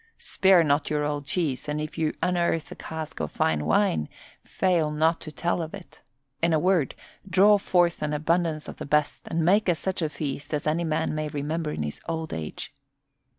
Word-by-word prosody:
Spare 190 Hz, -3 st, +4 dB
not 145 Hz, -1 st, +1 dB
your 150 Hz, -1 st, 0 dB
old 145 Hz, -1 st, -3 dB
cheese, 150 Hz, -5 st, -1 dB
and 150 Hz, 0 st, -1 dB
if 155 Hz, 0 st, -5 dB
you 160 Hz, -2 st, -1 dB
unearth 175 Hz, -3 st, 0 dB
a -, -, -6 dB
cask 160 Hz, -1 st, -6 dB
of 75 Hz, -1 st, -3 dB
fine 75 Hz, -1 st, 0 dB
wine 80 Hz, -3 st, +2 dB, 0.3 s
fail 175 Hz, -5 st, +1 dB
not 160 Hz, +2 st, +1 dB
to 155 Hz, -, -8 dB
tell 170 Hz, +3 st, -1 dB
of 160 Hz, +3 st, -5 dB
it. 190 Hz, -3 st, -14 dB, 0.4 s
In 165 Hz, 0 st, +3 dB
a 155 Hz, -, +4 dB
word, 180 Hz, -5 st, +2 dB, 0.3 s
draw 200 Hz, +4 st, +6 dB
forth 175 Hz, -3 st, +2 dB
an 150 Hz, -1 st, -1 dB
abundance 155 Hz, +1 st, 0 dB
of -, -, -8 dB
the -, -, -6 dB
best 150 Hz, 0 st, 0 dB
and 165 Hz, -1 st, 0 dB
make 200 Hz, +3 st, +4 dB
us 170 Hz, -, +2 dB
such 185 Hz, +4 st, -3 dB
a 160 Hz, -, 0 dB
feast 145 Hz, 0 st, -4 dB
as 145 Hz, -, -3 dB
a 155 Hz, -, +2 dB
man 160 Hz, -1 st, -1 dB
may 155 Hz, 0 st, -2 dB
remember 150 Hz, +2 st, -3 dB
in 75 Hz, -, -3 dB
his 75 Hz, 0 st, -5 dB
old 160 Hz, -1 st, -3 dB
age." 80 Hz, -1 st, -6 dB
155 Hz, 200 wpm, -26 LUFS, 150-170 Hz, 0.4 s, draw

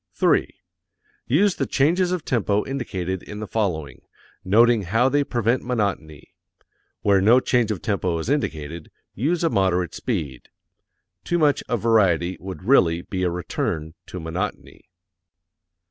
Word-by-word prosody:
3. -, -, +2 dB, 0.8 s
Use 185 Hz, +9 st, +2 dB
the -, -, -1 dB
changes 175 Hz, +6 st, +2 dB
of 180 Hz, -3 st, -2 dB
tempo 105 Hz, -5 st, 0 dB
indicated 95 Hz, -9 st, -4 dB
in 105 Hz, -, -9 dB
the 110 Hz, -, -4 dB
following, 90 Hz, -9 st, -3 dB, 0.4 s
noting 115 Hz, +4 st, +4 dB
how 110 Hz, +7 st, +2 dB
they 145 Hz, +2 st, +2 dB
prevent 120 Hz, -1 st, 0 dB
monotony. 100 Hz, -, -3 dB, 0.7 s
Where 100 Hz, -2 st, +4 dB
no 115 Hz, +6 st, +6 dB
change 120 Hz, -3 st, +1 dB
of 105 Hz, -5 st, -3 dB
tempo 95 Hz, -6 st, -1 dB
is 80 Hz, -, -4 dB
indicated, 85 Hz, -, -3 dB, 0.2 s
use 160 Hz, -, -1 dB
a 165 Hz, -, +3 dB
moderate 90 Hz, -2 st, +1 dB
speed. 80 Hz, -, -4 dB, 0.7 s
Too 175 Hz, -, 0 dB
much 150 Hz, -4 st, +2 dB
of 120 Hz, -4 st, -1 dB
variety 95 Hz, -6 st, +3 dB
would 95 Hz, -3 st, -8 dB
really 90 Hz, -8 st, +3 dB
be 95 Hz, -2 st, -4 dB
a 90 Hz, -, +1 dB
return 80 Hz, -2 st, -3 dB
to 90 Hz, -, -7 dB
monotony. 90 Hz, +4 st, -5 dB
105 Hz, 140 wpm, -23 LUFS, 90-125 Hz, 0.8 s, no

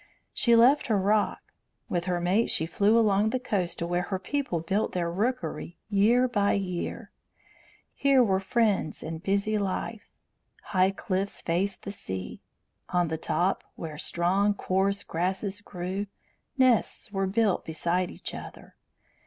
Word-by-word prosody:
She 235 Hz, -1 st, +4 dB
left 250 Hz, +6 st, +5 dB
her 215 Hz, -, +2 dB
rock. 205 Hz, +2 st, 0 dB, 0.3 s
With 175 Hz, -1 st, -1 dB
her 180 Hz, -1 st, 0 dB
mate 185 Hz, +6 st, +2 dB
she 160 Hz, -, 0 dB
flew 205 Hz, +6 st, +3 dB
along 210 Hz, -1 st, +3 dB
the 255 Hz, -, -1 dB
coast 195 Hz, -8 st, -2 dB
to 170 Hz, -, -2 dB
where 175 Hz, +1 st, 0 dB
her 190 Hz, +2 st, -2 dB
people 265 Hz, -, -2 dB
built 195 Hz, +6 st, -1 dB
their 170 Hz, -2 st, -1 dB
rookery 215 Hz, -3 st, -2 dB
year 230 Hz, +6 st, +4 dB
by 205 Hz, -5 st, +2 dB
year. 180 Hz, -3 st, -3 dB, 0.8 s
Here 275 Hz, -2 st, +4 dB
were 190 Hz, -4 st, +2 dB
friends 200 Hz, -4 st, 0 dB
and 160 Hz, 0 st, -5 dB
busy 200 Hz, +2 st, +1 dB
life. 205 Hz, +3 st, -3 dB, 0.5 s
High 185 Hz, -1 st, +2 dB
cliffs 195 Hz, 0 st, -3 dB
faced 185 Hz, +4 st, -1 dB
the 200 Hz, -, -5 dB
sea. 95 Hz, -, -6 dB, 0.5 s
On 175 Hz, -2 st, +1 dB
the 160 Hz, -, -2 dB
top, 180 Hz, +3 st, 0 dB
where 155 Hz, -2 st, -7 dB
strong, 195 Hz, +6 st, +1 dB
coarse 195 Hz, +1 st, 0 dB
grasses 190 Hz, +4 st, -2 dB
grew, 190 Hz, +1 st, -4 dB, 0.5 s
nests 255 Hz, -5 st, +2 dB
were 195 Hz, -1 st, 0 dB
built 205 Hz, 0 st, +1 dB
beside 175 Hz, +3 st, -1 dB
each -, -, -7 dB
other. -, -, -10 dB
195 Hz, 145 wpm, -27 LUFS, 175-215 Hz, 0.8 s, left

